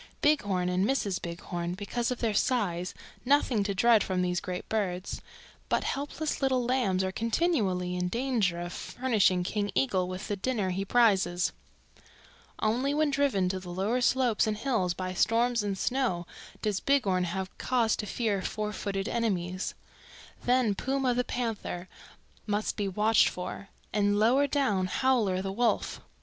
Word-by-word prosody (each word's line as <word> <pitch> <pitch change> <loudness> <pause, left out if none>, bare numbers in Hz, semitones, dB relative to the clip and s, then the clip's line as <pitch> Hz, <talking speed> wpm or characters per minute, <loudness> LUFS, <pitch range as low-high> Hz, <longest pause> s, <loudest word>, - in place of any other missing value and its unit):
Bighorn 205 -12 +2
and 180 +1 +1
Mrs. 205 -5 0
Bighorn, 170 +1 -4
because 235 +5 -2
of 250 - -3
their 225 -3 +1
size, 190 -7 0 0.3
nothing 260 -4 +3
to 200 -1 -1
dread 230 0 +5
from 185 -1 -1
these 180 -1 0
great 180 -1 -5
birds, 190 -4 -2 0.5
but - - +1
helpless 290 +2 -3
little 260 -2 +2
lambs 235 -7 +1
are 190 - -1
continually 210 - 0
in 180 0 -1
danger 230 -6 0
of 175 +1 -5
furnishing 215 -8 +1
King 205 +2 -1
Eagle 190 -9 +1
with 185 +2 -5
the 205 - -1
dinner 200 -2 -1
he 190 +2 -1
prizes. 195 -5 +3 1.0
"Only 250 +6 +1
when 305 -1 +2
driven 275 -10 +2
to 190 0 -2
the 180 -1 -10
lower 200 +8 0
slopes 245 -3 +2
and 215 -1 -1
hills 215 -8 0
by 185 0 -4
storms 230 +4 +2
and 200 -2 -2
snow 240 -8 0 0.4
does 210 -2 0
Bighorn 200 -10 +2
have 190 +2 -4
cause 235 -3 +2
to 210 - -4
fear 210 -3 -1
four 210 +2 -3
footed 195 -1 -3
enemies. 185 -6 -1 0.7
Then 245 -4 +3
Puma 265 +4 0
the 250 +1 +1
Panther 225 -8 -3 0.6
must 210 0 -1
be 205 -2 -1
watched 210 +3 +4
for, 180 +2 -6 0.2
and 205 0 +2
lower 250 +7 +4
down 215 -10 +1
Howler 210 -5 +1
the 195 - -2
Wolf. 235 +4 0
210 Hz, 155 wpm, -29 LUFS, 185-245 Hz, 1.0 s, dread